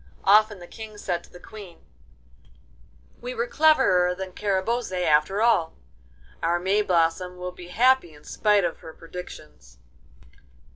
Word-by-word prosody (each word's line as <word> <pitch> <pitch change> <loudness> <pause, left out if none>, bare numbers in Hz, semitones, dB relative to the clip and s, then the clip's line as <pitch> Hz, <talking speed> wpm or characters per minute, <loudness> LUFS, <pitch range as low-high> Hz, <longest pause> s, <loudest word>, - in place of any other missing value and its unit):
Often 210 +1 +5
the 175 - -11
King 215 +3 -10
said 180 -4 -3
to - - -22
the 175 - -14
Queen: 200 -3 -13 1.4
'We 250 +1 -6
were 235 0 -1
cleverer 240 - +3
than 190 0 -7
Carabosse 205 +4 -2
after 155 +8 +2
all. 200 -9 +2 0.7
Our 170 +1 +1
Mayblossom 180 -2 0
will 180 0 -5
be 180 -1 -12
happy 245 -1 +2
in 150 -1 -18
spite 210 -2 +1
of 170 -1 -3
her 160 - -11
predictions. 160 - -11
185 Hz, 135 wpm, -24 LUFS, 175-215 Hz, 1.4 s, Often